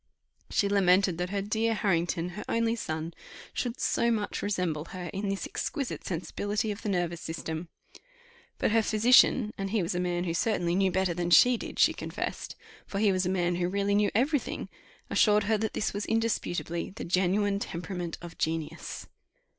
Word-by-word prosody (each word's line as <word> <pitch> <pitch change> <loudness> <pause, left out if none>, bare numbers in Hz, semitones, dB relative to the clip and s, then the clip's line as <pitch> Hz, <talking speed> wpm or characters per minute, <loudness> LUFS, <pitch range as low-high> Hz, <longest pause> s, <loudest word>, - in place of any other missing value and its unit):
She 200 - +2
lamented 190 -2 +3
that 180 0 -1
her 200 0 -1
dear 220 +2 0
Harrington, 175 -3 0
her 190 +4 -7
only 230 0 +1
son, 160 -5 -4 0.4
should 245 0 -3
so 235 - +2
much 215 -3 -1
resemble 180 -7 -1
her 180 -1 -7
in 195 +1 -2
this 195 0 -2
exquisite 300 - -3
sensibility 205 +4 -2
of 205 - -6
the 210 - -3
nervous 175 -3 -1
system. 160 +1 -5 0.9
But - - +1
her 225 +1 +4
physician, 220 +1 +5
and 195 0 -2
he 210 -2 +1
was 170 - -2
a 175 - -1
man 175 -1 -1
who 170 -2 -2
certainly 175 -2 +1
knew 190 0 +2
better 185 -1 +1
than 175 0 -2
she 245 +9 +7
did, - - -7
she - - +5
confessed, - - -5 0.3
for 195 - -4
he 205 0 +4
was 185 -1 +1
a - - +1
man 175 -2 +1
who 175 0 0
really 200 +1 0
knew 205 0 +3
every 280 +6 +3
thing, - - -6 0.4
assured 210 -1 +4
her 215 +1 +1
that 220 0 -2
this 215 - -1
was 205 +1 -3
indisputably 215 -6 -1
"the - - -5
genuine 195 +3 +1
temperament 175 -2 -4
of 170 -1 -10
genius." 160 0 -3
195 Hz, 185 wpm, -29 LUFS, 175-210 Hz, 0.9 s, she